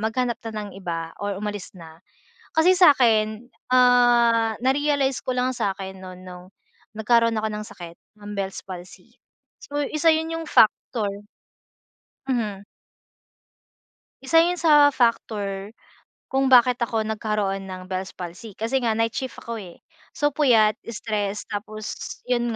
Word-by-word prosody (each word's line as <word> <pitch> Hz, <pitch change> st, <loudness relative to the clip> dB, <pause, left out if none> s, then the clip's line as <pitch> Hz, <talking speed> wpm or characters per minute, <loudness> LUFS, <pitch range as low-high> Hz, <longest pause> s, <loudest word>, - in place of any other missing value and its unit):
maghanap 235 Hz, +2 st, -1 dB
na -, -, -7 dB
ng 200 Hz, -, -9 dB
iba 165 Hz, -2 st, -4 dB
or 205 Hz, -1 st, -3 dB
umalis 205 Hz, -1 st, -5 dB
na. 165 Hz, -2 st, -13 dB, 0.5 s
Kasi 355 Hz, +4 st, +4 dB
sa 355 Hz, -5 st, +8 dB
akin, 220 Hz, -2 st, +1 dB, 0.2 s
ah, 240 Hz, -2 st, +4 dB
na-realize 275 Hz, +1 st, +1 dB
ko 255 Hz, -, -1 dB
lang 250 Hz, +1 st, +1 dB
sakin 190 Hz, -1 st, -3 dB
noon 185 Hz, -1 st, -10 dB
noong 180 Hz, -1 st, -11 dB, 0.5 s
nagkaroon 230 Hz, +1 st, +3 dB
ako 220 Hz, 0 st, -1 dB
ng 210 Hz, 0 st, -5 dB
sakit, 170 Hz, -1 st, -11 dB, 0.2 s
ng 205 Hz, 0 st, -8 dB
Bell's 195 Hz, -1 st, -3 dB
palsy. 180 Hz, -1 st, -11 dB, 0.5 s
So, 290 Hz, 0 st, -4 dB
isa 310 Hz, +3 st, 0 dB
'yun, 320 Hz, +1 st, -1 dB
'yung 330 Hz, 0 st, -6 dB
factor 220 Hz, 0 st, +3 dB, 1.2 s
Hmm. 215 Hz, -6 st, -2 dB, 1.6 s
Isa 325 Hz, +5 st, +4 dB
'yun 345 Hz, +2 st, +3 dB
sa 300 Hz, -4 st, +6 dB
factor 210 Hz, -3 st, -1 dB, 0.6 s
kung 270 Hz, 0 st, +2 dB
bakit 250 Hz, -1 st, +5 dB
ako 230 Hz, -2 st, -1 dB
nagkaroon 210 Hz, -3 st, -2 dB
ng 185 Hz, 0 st, -9 dB
Bell's 185 Hz, 0 st, -4 dB
palsy, 180 Hz, +4 st, -9 dB
kasi 230 Hz, +6 st, -1 dB
nga 230 Hz, -3 st, 0 dB
night 225 Hz, 0 st, +1 dB
shift 260 Hz, +1 st, -5 dB
ako 230 Hz, -1 st, -5 dB
eh. 180 Hz, -4 st, -12 dB, 0.3 s
So, 290 Hz, 0 st, +1 dB
puyat, 230 Hz, -7 st, +3 dB
stress 210 Hz, -3 st, -3 dB
tapos 215 Hz, +1 st, -6 dB, 0.3 s
'yun 240 Hz, -2 st, -1 dB
225 Hz, 140 wpm, -23 LUFS, 200-255 Hz, 1.6 s, sa